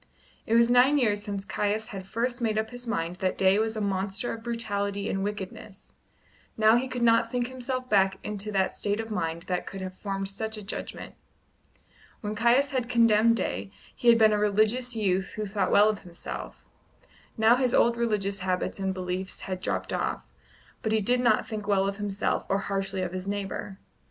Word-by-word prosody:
It 225 Hz, -, +2 dB
was 235 Hz, +1 st, +5 dB
nine 255 Hz, +4 st, +5 dB
years 210 Hz, -6 st, +2 dB
since 200 Hz, -2 st, -4 dB
Caius 210 Hz, +2 st, -1 dB
had 195 Hz, -4 st, -7 dB
first 240 Hz, +4 st, -2 dB
made 220 Hz, -2 st, 0 dB
up 220 Hz, +1 st, -1 dB
his 245 Hz, 0 st, -9 dB
mind 175 Hz, -5 st, -2 dB
that 185 Hz, 0 st, -1 dB
Day 195 Hz, +1 st, +4 dB
was 220 Hz, 0 st, -1 dB
a -, -, -2 dB
monster 195 Hz, +3 st, -1 dB
of 225 Hz, -, -7 dB
brutality 205 Hz, -4 st, -2 dB
and 195 Hz, 0 st, -1 dB
wickedness; 200 Hz, 0 st, -7 dB, 0.6 s
now 220 Hz, +1 st, +6 dB
he 250 Hz, +2 st, +1 dB
could 250 Hz, -2 st, -3 dB
not 230 Hz, 0 st, +4 dB
think 245 Hz, -1 st, 0 dB
himself 255 Hz, 0 st, -4 dB
back 195 Hz, -3 st, +3 dB
into 210 Hz, 0 st, -4 dB
the 190 Hz, -2 st, +2 dB
state 205 Hz, +1 st, -2 dB
of 225 Hz, 0 st, -5 dB
mind 165 Hz, -4 st, -2 dB
that 180 Hz, -1 st, -3 dB
could 195 Hz, -, -6 dB
have 185 Hz, -1 st, -6 dB
formed 195 Hz, 0 st, -4 dB
such 220 Hz, +3 st, -4 dB
a 210 Hz, -, -7 dB
judgment 195 Hz, -, -6 dB, 1.1 s
When 210 Hz, -1 st, -3 dB
Caius 240 Hz, +6 st, +3 dB
had 250 Hz, -3 st, -1 dB
condemned 230 Hz, -1 st, +4 dB
Day, 100 Hz, -, -2 dB, 0.3 s
he 245 Hz, -, -3 dB
had 235 Hz, -1 st, +8 dB
been 220 Hz, -1 st, +5 dB
a 210 Hz, -, +1 dB
religions 215 Hz, +4 st, +2 dB
youth 190 Hz, -3 st, 0 dB
who 215 Hz, -, -3 dB
thought 195 Hz, -2 st, -1 dB
well 205 Hz, +1 st, +6 dB
of 210 Hz, -2 st, -2 dB
himself; 175 Hz, -2 st, -8 dB, 0.7 s
now 220 Hz, +2 st, +6 dB
his 250 Hz, -1 st, +1 dB
old 235 Hz, 0 st, +4 dB
religious 210 Hz, -4 st, -1 dB
habits 185 Hz, +1 st, -2 dB
and 190 Hz, -1 st, -1 dB
beliefs 185 Hz, 0 st, -4 dB
had 185 Hz, -1 st, -5 dB
dropped -, -, -2 dB
off, -, -, -2 dB, 0.6 s
but 220 Hz, -, -1 dB
he 220 Hz, -, +3 dB
did 245 Hz, +5 st, +2 dB
not 235 Hz, -3 st, +3 dB
think 210 Hz, -2 st, -5 dB
well 195 Hz, -1 st, +2 dB
of 200 Hz, 0 st, -3 dB
himself 205 Hz, -1 st, -1 dB
or 195 Hz, -, +2 dB
harshly 195 Hz, -1 st, -2 dB
of 180 Hz, -1 st, -4 dB
his 185 Hz, +1 st, -5 dB
neighbour. 200 Hz, 0 st, -4 dB
210 Hz, 195 wpm, -27 LUFS, 195-230 Hz, 1.1 s, had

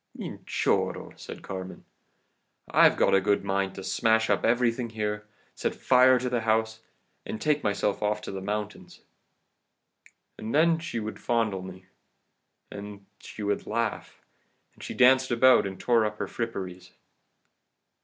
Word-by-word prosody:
"'Minchorro,' -, -, -2 dB
said -, -, -10 dB
Carmen, 95 Hz, -1 st, -7 dB, 0.9 s
'I've -, -, +5 dB
a 95 Hz, -, +4 dB
good 100 Hz, +1 st, +1 dB
mind 95 Hz, 0 st, -1 dB
to 95 Hz, -, -7 dB
smash 110 Hz, +4 st, +2 dB
up -, -, +1 dB
everything 120 Hz, 0 st, +1 dB
here, 105 Hz, -1 st, -4 dB, 0.3 s
set -, -, -3 dB
fire 130 Hz, 0 st, +5 dB
to 125 Hz, -, -2 dB
the 125 Hz, -2 st, -1 dB
house, 110 Hz, 0 st, 0 dB, 0.4 s
and 110 Hz, -, -6 dB
take 150 Hz, -1 st, +1 dB
myself 100 Hz, -1 st, 0 dB
off 105 Hz, 0 st, 0 dB
to -, -, -6 dB
the 95 Hz, -1 st, -5 dB
mountains.' 105 Hz, +1 st, -5 dB, 1.4 s
And 110 Hz, +5 st, -4 dB
then 165 Hz, +1 st, +4 dB
she 160 Hz, -8 st, -4 dB
would 110 Hz, 0 st, -6 dB
fondle 110 Hz, -5 st, 0 dB
me, 95 Hz, 0 st, -10 dB, 0.9 s
and 100 Hz, -, -7 dB
then 100 Hz, -1 st, -17 dB
she 105 Hz, -, -9 dB
would 100 Hz, 0 st, -2 dB
laugh, -, -, -3 dB, 0.5 s
and -, -, -18 dB
she -, -, -6 dB
danced 130 Hz, +1 st, +5 dB
about 125 Hz, -2 st, +5 dB
and 95 Hz, -1 st, -8 dB
tore 120 Hz, -2 st, +3 dB
up 105 Hz, 0 st, -2 dB
her -, -, -3 dB
fripperies. 95 Hz, -6 st, -6 dB
110 Hz, 145 wpm, -27 LUFS, 100-120 Hz, 1.4 s, I've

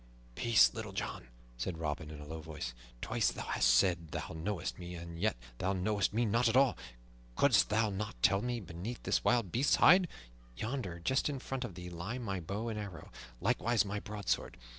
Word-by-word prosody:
"Peace, 65 Hz, -, +5 dB
Little -, -, -6 dB
John!" -, -, -4 dB, 0.3 s
said 80 Hz, +8 st, -3 dB
Robin 75 Hz, -1 st, -3 dB
in 75 Hz, -1 st, -8 dB
a 75 Hz, -, -8 dB
low 80 Hz, +1 st, -6 dB
voice. 75 Hz, -6 st, -6 dB, 0.3 s
"Twice -, -, +1 dB
thou -, -, -6 dB
hast -, -, +2 dB
said 85 Hz, +7 st, +4 dB
thou 75 Hz, -, -5 dB
knowest 90 Hz, +3 st, -3 dB
me, 90 Hz, 0 st, -6 dB
and 85 Hz, 0 st, -8 dB
yet 105 Hz, -, +1 dB, 0.2 s
thou 95 Hz, +2 st, +1 dB
knowest 100 Hz, +1 st, +1 dB
me 115 Hz, +3 st, +1 dB
not 115 Hz, +2 st, +3 dB
at 115 Hz, -, +3 dB
all. 135 Hz, -2 st, +5 dB, 0.6 s
Couldst 130 Hz, -8 st, +4 dB
thou 110 Hz, 0 st, +2 dB
not 95 Hz, -, -4 dB
tell 100 Hz, 0 st, +5 dB
me 120 Hz, 0 st, -2 dB
beneath 95 Hz, +5 st, -6 dB
this -, -, +1 dB
wild 115 Hz, -7 st, +2 dB
beast's 130 Hz, +5 st, +3 dB
hide? 180 Hz, +1 st, +7 dB, 0.5 s
Yonder, 110 Hz, -, -3 dB
just 130 Hz, -, +1 dB
in 140 Hz, -, -2 dB
front 130 Hz, 0 st, -4 dB
of 105 Hz, -8 st, -6 dB
thee, 90 Hz, 0 st, -7 dB
lie 90 Hz, +8 st, -4 dB
my 100 Hz, -7 st, -3 dB
bow 100 Hz, +7 st, -4 dB
and 110 Hz, -2 st, -3 dB
arrows, 100 Hz, -5 st, -7 dB, 0.3 s
likewise 120 Hz, -, +2 dB
my 100 Hz, +1 st, -3 dB
broadsword. 105 Hz, -1 st, -2 dB
100 Hz, 195 wpm, -33 LUFS, 85-115 Hz, 0.6 s, hide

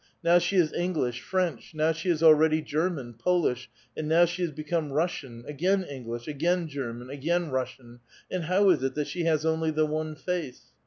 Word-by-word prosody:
Now 170 Hz, +1 st, +6 dB
she 175 Hz, +3 st, -1 dB
is 170 Hz, -5 st, +3 dB
English, 150 Hz, -9 st, -1 dB
French, 185 Hz, -3 st, -2 dB
now 155 Hz, +1 st, +2 dB
she 165 Hz, +3 st, -3 dB
is 165 Hz, -2 st, +1 dB
already 155 Hz, 0 st, +6 dB
German, 155 Hz, -6 st, -2 dB
Polish, 130 Hz, -1 st, 0 dB, 0.3 s
and 155 Hz, -, -3 dB
now 165 Hz, +2 st, +5 dB
she 175 Hz, +2 st, -4 dB
has 175 Hz, -, +1 dB
become 155 Hz, 0 st, -3 dB
Russian, 140 Hz, -6 st, -2 dB
again 185 Hz, +7 st, +1 dB
English, 120 Hz, -6 st, -7 dB
again 170 Hz, +4 st, 0 dB
German, 125 Hz, -3 st, -6 dB
again 165 Hz, +3 st, -1 dB
Russian; 125 Hz, -2 st, -4 dB, 0.3 s
and 180 Hz, -3 st, -2 dB
how 190 Hz, +3 st, +4 dB
is 155 Hz, -7 st, +2 dB
it 135 Hz, 0 st, -1 dB
that 150 Hz, -1 st, -1 dB
she 175 Hz, +2 st, -3 dB
has 155 Hz, -1 st, +2 dB
only 160 Hz, 0 st, +1 dB
the 155 Hz, 0 st, +2 dB
one 155 Hz, 0 st, -3 dB
face? 160 Hz, -5 st, -5 dB
155 Hz, 190 wpm, -27 LUFS, 140-175 Hz, 0.3 s, Now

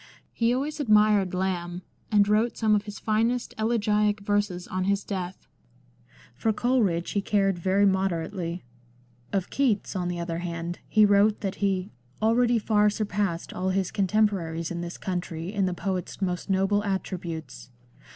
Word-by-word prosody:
He 230 Hz, 0 st, +2 dB
always 290 Hz, +5 st, -2 dB
admired 210 Hz, -6 st, +4 dB
Lamb, 180 Hz, -1 st, -2 dB, 0.3 s
and 205 Hz, -1 st, +5 dB
wrote 215 Hz, +3 st, +2 dB
some 220 Hz, -2 st, +2 dB
of 205 Hz, 0 st, +1 dB
his 205 Hz, -1 st, -7 dB
finest 230 Hz, +3 st, 0 dB
elegiac 210 Hz, -2 st, +2 dB
verses 205 Hz, -3 st, -1 dB
on 185 Hz, 0 st, -2 dB
his 200 Hz, 0 st, +1 dB
death. 185 Hz, -2 st, -5 dB, 0.9 s
For 220 Hz, -, 0 dB
Coleridge 215 Hz, -8 st, +1 dB
he 200 Hz, -, 0 dB
cared 195 Hz, -3 st, +1 dB
very 190 Hz, +3 st, +3 dB
moder 190 Hz, -4 st, +1 dB
ately. 175 Hz, -3 st, -5 dB, 0.7 s
Of 190 Hz, -2 st, -1 dB
Keats, 235 Hz, -8 st, 0 dB
on 180 Hz, -2 st, -1 dB
the 175 Hz, -1 st, -3 dB
other 170 Hz, -1 st, -3 dB
hand, 170 Hz, 0 st, -4 dB
he 215 Hz, -1 st, +5 dB
wrote 205 Hz, +1 st, +4 dB
that 195 Hz, -2 st, -3 dB
he 195 Hz, -1 st, 0 dB
" 125 Hz, +1 st, -34 dB
already 235 Hz, +2 st, +3 dB
far 210 Hz, -1 st, +3 dB
surpassed 205 Hz, -4 st, -2 dB
all 185 Hz, +1 st, -1 dB
his 190 Hz, -1 st, 0 dB
contemporaries 190 Hz, -5 st, 0 dB
in 170 Hz, 0 st, -3 dB
this 175 Hz, 0 st, -6 dB
country 175 Hz, -1 st, -4 dB
in 195 Hz, -3 st, +1 dB
the 180 Hz, -, -2 dB
poet's 185 Hz, -1 st, -3 dB
most 180 Hz, -1 st, -2 dB
noble 195 Hz, +2 st, +2 dB
attributes." 170 Hz, -9 st, -4 dB
195 Hz, 160 wpm, -26 LUFS, 180-210 Hz, 0.9 s, and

